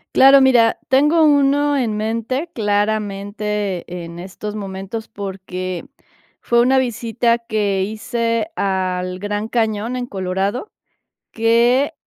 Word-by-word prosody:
Claro, 270 +1 +8
mira, 240 -4 +4
tengo 300 +5 +4
1 285 0 +3
en 225 -5 0
mente 230 +8 -2
claramente 205 -2 -1 0.2
en 170 +1 -10
estos 195 +3 -7
momentos 195 +2 -6
porque 185 -1 -6 0.6
fue 235 0 +3
una 260 +2 +4
visita 235 -1 0
que 210 -4 -1
hice 230 +5 -2
al 185 -1 -1
Gran 205 +2 -3
Cañón 225 0 -1
en 250 -1 -3
Colorado, 195 - -3 0.6
que, 240 +6 +3
220 Hz, 110 wpm, -19 LUFS, 195-245 Hz, 0.6 s, Claro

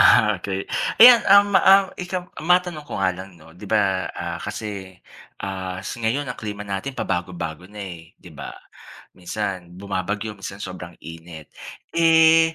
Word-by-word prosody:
Ah, - - +6
okey. 95 -1 -3 0.4
Ayan, 240 0 +10
ah, 200 - +9
ma - - +6
ah, 195 0 +7 0.2
ikam 180 0 -3 0.3
matanong 175 -4 +2
ko - - -6
nga 95 -1 +2
lang 95 +1 -9
no, 80 - -18
'di 105 - -10
ba, 105 - +4 0.4
ah, 85 0 -4
kasi, 105 +1 -5 0.8
ah, 95 -1 -5
s 110 - -6
ngayon 120 +6 0
ang 125 - -6
klima 105 -1 -5
natin 105 +8 -4
pabago-bago 90 -2 -3
na, 105 - -12 0.2
eh, - - -12 0.2
'di 90 - -14
ba? - - -6 0.7
minsan 100 +2 -3 0.2
bumabagyo, 100 +2 -3
minsan 100 +1 -8
sobrang 90 -2 -9 0.2
init. 80 -2 -11 0.6
Eh, 160 0 +6
100 Hz, 160 wpm, -22 LUFS, 90-150 Hz, 0.8 s, Ayan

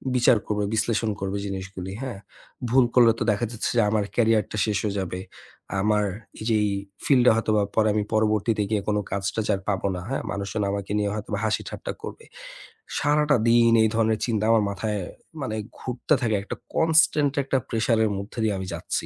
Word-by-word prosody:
বিচার 120 -2 +5
করবে, 105 -1 0
বিশ্লেষণ 110 0 +1
করবে 95 +1 -2
জিনিসগুলি, 95 -1 -6
হ্যাঁ? 120 -7 -5 0.5
ভুল 130 +1 +5
করলে 120 -2 +7
তো - - +1
দেখা 110 +4 0
যাচ্ছে 115 - -2
যে, - - +6
আমার 105 -1 +1
career 115 -3 +3
টা - - -4
শেষ 105 -2 0
হয়ে 100 -1 -1
যাবে। 90 -1 -4 0.6
আমার 105 +1 +2 0.4
এই - - -5
যে 110 - +3
এই 105 - +1 0.4
field 130 -4 +5
টা - - +9
হয়তোবা 110 -2 +2
পরে 110 -1 +3
আমি 105 -1 +1
পরবর্তীতে 110 0 +2
গিয়ে 105 -2 +1
কোন 105 - +1
কাজটা 100 +2 -2
যে - - +2
আর 95 - -7
পাব 95 -2 0
না, 90 - -5
হ্যাঁ? 135 - -2
মানুষজন 100 +1 -2
আমাকে 100 0 -4
নিয়ে 105 -1 0
হয়তোবা 105 -1 -4
হাসিঠাট্টা 110 - -3
করবে। 460 - -8 0.7
সারাটা 150 0 +3
দিন 115 0 +5
এই 110 - +3
ধরনের 110 -1 +2
চিন্তা 110 -3 -1
আমার 115 -2 +4
মাথায় 105 +1 -2 0.4
মানে 110 -5 -3 0.2
ঘুরতে 125 +4 -1
থাকে। 110 -3 +1
একটা - - -5 0.2
constant 155 -3 +3
একটা 135 0 0
pressure 115 0 +1
এর 105 - 0
মধ্যে 100 +4 -8
দিয়ে 110 - +1
আমি 95 - -5
যাচ্ছি। 85 +1 -3
110 Hz, 190 wpm, -25 LUFS, 100-115 Hz, 0.7 s, টা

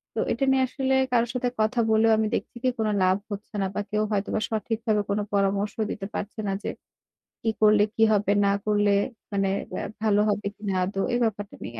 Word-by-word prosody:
তো - - -1
এটা 270 - 0
নিয়ে 265 0 +3
আসলে 265 0 0 0.2
কারো 235 -1 +3
সাথে 250 -1 0
কথা 220 +3 +1
বলেও 220 +1 +4
আমি 220 0 +1
দেখছি - - -5
কি 255 - +3
কোন 220 - +1 0.2
লাভ 185 +1 +4
হচ্ছে 205 +1 -7
না। 195 - +1
বা - - 0
কেউ 210 0 +1
হয়তোবা 205 +1 0
সঠিকভাবে 220 0 0
কোন 200 +1 +1
পরামর্শ 200 +1 +1 0.2
দিতে 195 -1 -5
পারছে 210 +2 -5
না 195 - 0
যে - - -2 0.7
কি 225 - +1
করলে 210 -1 +6
কি 225 - +3
হবে, 205 -1 +2 0.2
না 200 - +3
করলে 205 -1 +3 0.4
মানে 195 -1 +1 0.5
ভালো 210 -1 +3
হবে 205 0 -1
কিনা 205 -2 -3
আদৌ। 195 +1 -2
এই 240 - +2
ব্যাপারটা 205 -2 -2
নিয়ে 115 -1 -7
210 Hz, 200 wpm, -26 LUFS, 200-225 Hz, 0.7 s, করলে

